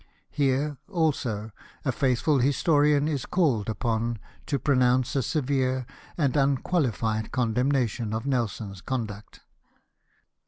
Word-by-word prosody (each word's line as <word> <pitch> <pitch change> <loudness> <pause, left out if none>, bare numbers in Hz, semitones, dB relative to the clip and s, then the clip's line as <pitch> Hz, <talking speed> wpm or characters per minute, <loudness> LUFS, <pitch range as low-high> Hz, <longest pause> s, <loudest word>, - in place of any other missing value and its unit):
Here, 140 +1 0
also, 135 - -1 0.3
a 135 - +2
faithful 130 +3 +2
historian 145 +2 +3
is 145 -5 -2
called 130 - +1
upon 115 +1 -1 0.3
to 140 - 0
pronounce 130 -2 +2
a 135 - +3
severe 130 -2 0 0.3
and 145 -5 +1
unqualified 130 - +1
condem 125 +2 +1
nation 120 -4 0
of 110 +3 -3
Nelson's 110 -7 -2
conduct. 110 -5 -5
130 Hz, 110 wpm, -26 LUFS, 115-145 Hz, 0.3 s, historian